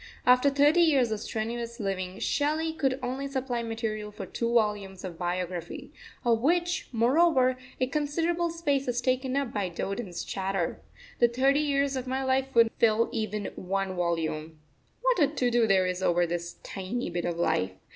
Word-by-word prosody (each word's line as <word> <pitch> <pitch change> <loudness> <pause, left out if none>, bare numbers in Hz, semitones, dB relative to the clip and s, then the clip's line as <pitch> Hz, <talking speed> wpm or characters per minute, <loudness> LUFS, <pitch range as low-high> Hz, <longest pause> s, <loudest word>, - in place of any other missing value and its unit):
After 250 +3 +6
thirty 290 +5 +4
years 275 -8 +4
of 215 - -1
strenuous 235 +2 -4
living 190 -2 -3
Shelley 310 +6 0
could 270 -4 0
only 260 +3 -2
supply 260 -3 -2
material 225 -2 -3
for 200 -1 -7
two 235 +5 -2
volumes 210 -5 0
of 175 -3 -7
biography, 175 -1 -4 0.3
of 230 -1 +3
which, 345 +5 +1
moreover, 255 +2 +3 0.2
a 255 - +3
considerable 325 +5 0
space 290 -5 -1
is 245 -1 0
taken 255 +1 0
up 280 -3 -1
by 200 -3 -1
Dowden's 195 +2 -4
chatter. 190 -3 -2 0.4
The 240 - +6
thirty 265 +4 +2
years 280 -2 +1
of 260 -1 -4
my 265 +1 -1
life 265 0 0
would 230 -1 +6
not - - -35
fill 230 0 +3
even 215 -2 -3
one 195 0 -2
volume. 160 -2 -2 0.4
What - - +3
a 295 - +5
to 260 -4 0
do 235 -1 +3
there 190 -2 +4
is 180 0 -2
over 175 -1 +3
this 170 0 -4
tiny 195 +4 -4
bit 175 0 -2
of 170 -1 -2
life! 95 - +1
235 Hz, 175 wpm, -28 LUFS, 190-275 Hz, 0.4 s, After